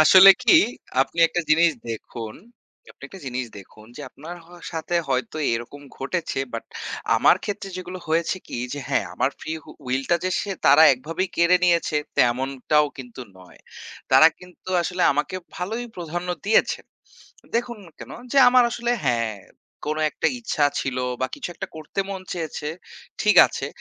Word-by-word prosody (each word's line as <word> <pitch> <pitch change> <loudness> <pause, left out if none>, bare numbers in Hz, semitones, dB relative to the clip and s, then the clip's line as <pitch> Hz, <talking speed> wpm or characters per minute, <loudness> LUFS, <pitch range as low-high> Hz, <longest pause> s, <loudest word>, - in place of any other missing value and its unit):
আসলে 185 +5 +9
কি? 255 - +6 0.4
আপনি 150 +5 -1
একটা 175 - -1
জিনিস 165 +2 +5 0.2
দেখুন 115 0 -6 0.5
যে - - -20
আপনি - - -32
একটা 195 - -12
জিনিস 125 0 -3
দেখুন 105 +2 -15
যে - - -8
আপনার 165 +5 -9
হওয়া 175 0 -15
সাথে 165 +1 -4
হয়তো 130 +2 -1 0.2
এরকম 120 +5 -5 0.2
ঘটেছে। 160 +1 -3
বাট 115 - -5 0.5
আমার 125 - +5
ক্ষেত্রে 205 -1 -4
যেগুলো 185 0 -7
হয়েছে 165 +3 +1
কি? - - -5
যে 145 - -4
হ্যাঁ, - - +1
আমার - - +1
ফ্রি 160 - -5 0.2
উ - - -9 0.2
উইল 130 +2 0
টা 170 - +5
যে 185 - 0 0.4
তারা 145 +3 +7
একভাবেই 165 +8 -3
কেড়ে 170 +2 +5
নিয়েছে 170 -3 +2 0.2
তেমনটাও 135 +4 +2
কিন্তু 125 0 -9 0.2
নয়। 90 - -17 0.5
তারা - - +8
কিন্তু 180 0 -15
আসলে 180 +1 -2
আমাকে 150 +6 -2 0.2
ভালোই 220 +7 -3
প্রধান্য 175 +1 -5 0.2
দিয়েছেন। 220 - +2 0.7
দেখুন 235 -1 -1 0.2
কেন? - - -10 0.2
যে 275 - +4
আমার 250 0 +6
আসলে 240 0 -2
হ্যাঁ, 115 -4 0 0.5
কোন 155 +1 -1
একটা - - -1
ইচ্ছা 165 -10 0 0.2
ছিল 130 -1 -3 0.2
বা 130 - +1
কিছু - - -6
একটা - - -6
করতে 155 +5 -4
মন 195 -1 -5
চেয়েছে, 160 -3 -4 0.5
ঠিক 210 - +3
আছে। - - -5
160 Hz, 160 wpm, -23 LUFS, 135-185 Hz, 0.7 s, আসলে